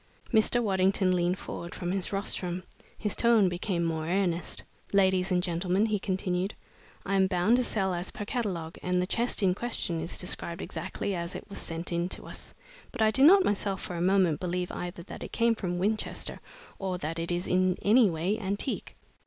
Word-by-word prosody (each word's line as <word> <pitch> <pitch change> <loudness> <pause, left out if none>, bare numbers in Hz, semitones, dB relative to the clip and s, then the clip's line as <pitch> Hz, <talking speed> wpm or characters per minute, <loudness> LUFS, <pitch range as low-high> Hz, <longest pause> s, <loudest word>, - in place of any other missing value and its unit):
Mr. 235 +2 +4
Waddington 190 -2 +2
leaned 175 +1 +1
forward 170 -2 -7
from 175 0 -3
his 190 -1 -1
rostrum. 185 -3 -1 0.3
His 210 -3 -2
tone 230 -4 +5
became 175 0 -1
more 160 -1 -1
earnest. 180 -1 -1 0.3
"Ladies 190 -1 +3
and 180 -1 +2
gentlemen," 180 +3 +1
he 215 -2 0
continued, 185 0 -1 0.5
"I 195 - -1
am 190 -1 +4
bound 190 +5 +3
to 255 - +2
sell 195 -5 0
as 175 +1 -2
per 205 - -6
catalogue, 185 -9 -3
and 180 0 +1
the 180 - +1
chest 235 +2 0
in 185 -2 +4
question 190 -6 -2
is 165 - -4
described 175 -1 -2
exactly 200 - -4
as 170 0 -4
it - - -7
was - - -6
sent 165 +2 -4
in 170 +1 0
to - - -4
us, - - -10 0.4
but 235 -3 0
I 215 - +5
do 265 +5 +3
not 380 +5 +8
myself 200 -1 0
for 180 - -6
a 170 - -2
moment 185 -4 +3
believe 180 0 -2
either 175 -1 -5
that - - -9
it - - -7
came 230 0 +3
from 180 -5 -3
Winchester 210 +4 -1 0.4
or 190 -2 -2
that 165 0 -4
it 170 +1 -2
is 175 +1 -1
in 185 0 +2
any 220 +1 +6
way 175 +6 -1
antique. 200 +5 -3
185 Hz, 195 wpm, -29 LUFS, 175-205 Hz, 0.5 s, not